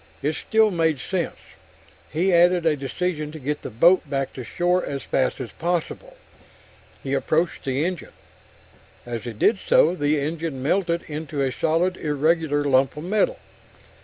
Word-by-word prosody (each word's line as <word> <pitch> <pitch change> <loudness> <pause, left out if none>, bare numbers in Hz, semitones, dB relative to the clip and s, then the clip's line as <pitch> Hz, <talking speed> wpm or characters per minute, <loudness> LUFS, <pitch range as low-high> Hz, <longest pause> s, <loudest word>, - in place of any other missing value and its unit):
It 150 +2 +1
still 220 +5 +2
made 165 -4 +1
sense, - - -2 0.8
and 160 - -2
he 190 -1 +3
added 175 0 +4
a 160 -2 +3
decision 150 +3 -3
to - - -7
get 145 +2 -3
the - - -6
boat 165 +7 +4
back 135 -1 -2
to 130 - -7
shore 180 +7 0
as 140 -1 -4
fast 130 - 0
as 125 -3 -6
possible. 180 - -3 0.9
He 135 - -3
approached 155 +5 0
the 135 +3 0
engine. 180 -3 -4 0.9
As 120 -2 -5
he 120 - -5
did 195 - +2
so, 165 - +4
the 145 -3 +1
engine 155 -2 -3
melted 170 +2 0
into 150 -2 -4
a 135 - 0
solid, 170 +7 0
irregular 150 0 +1
lump 135 0 +2
of 150 - -6
metal. 215 - +1
155 Hz, 160 wpm, -23 LUFS, 140-175 Hz, 0.9 s, added